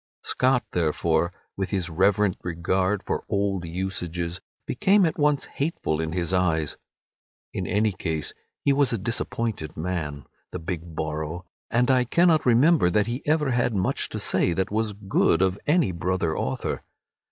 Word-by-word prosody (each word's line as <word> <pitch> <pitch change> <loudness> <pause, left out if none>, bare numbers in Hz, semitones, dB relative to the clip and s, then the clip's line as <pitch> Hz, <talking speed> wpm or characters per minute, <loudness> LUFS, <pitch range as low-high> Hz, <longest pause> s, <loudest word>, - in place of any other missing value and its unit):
Scott 130 -1 +2
therefore, 85 0 +1 0.2
with 95 -1 -2
his 95 -3 -1
reverent 95 +3 +2
regard 95 +3 0
for - - -2
old 100 -3 0
usages, 90 -1 -3 0.2
became 195 0 +3
at 160 - -1
once 145 -1 +2
hateful 140 - -2
in 80 -1 -2
his 85 +1 -1
eyes. 80 -5 +1 0.8
In - - -3
any 105 +1 +2
case 80 -4 -3 0.3
he 140 - +5
was 140 -1 +3
a 115 - +1
disappointed 110 -5 -2
man, 80 -4 -3 0.3
the - - -4
big 85 -1 -6
Borrow, 80 +3 -3 0.2
and 125 +2 +3
I 130 -1 +4
cannot 165 +2 +3
remember 125 - +5
that 105 +3 +2
he 120 +4 -3
ever 150 -3 +2
had 120 -2 +1
much 95 -1 0
to - - -5
say 85 - +2
that 95 +2 -1
was 110 0 0
good 95 -3 +2
of 95 +1 +1
any 155 - +3
brother 85 -1 -1
author. - - -2
95 Hz, 155 wpm, -25 LUFS, 85-120 Hz, 0.8 s, he